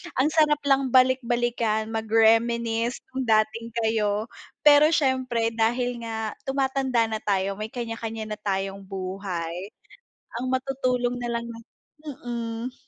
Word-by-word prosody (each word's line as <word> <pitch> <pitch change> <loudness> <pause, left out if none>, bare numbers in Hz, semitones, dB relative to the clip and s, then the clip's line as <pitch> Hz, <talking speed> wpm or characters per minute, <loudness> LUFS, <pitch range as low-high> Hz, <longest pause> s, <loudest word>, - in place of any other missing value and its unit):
ang 265 +4 +3
sarap 300 -2 +3
lang 275 -1 +3
balik-balikan, 240 -4 +2
mag-reminisce 225 +1 +2
'yung 260 -2 -3
dating 220 +1 +2 0.2
kayo. 215 -1 0 0.3
Pero 295 0 +7
siyempre 255 -6 +1
dahil 240 +2 0
nga 220 -1 -3 0.2
tumatanda 265 -3 +1
na 220 -1 -2
tayo 195 -1 -1
may 215 - -3
kanya-kanya 225 -2 -5
na 210 - -4
tayong 195 -1 -2
buhay. 185 -2 -4 0.7
Ang - - -2
matutulong 255 -2 0
nalang 235 -1 -2
na 230 -1 -8 0.6
mm. 235 +1 -4
230 Hz, 115 wpm, -25 LUFS, 220-255 Hz, 0.7 s, Pero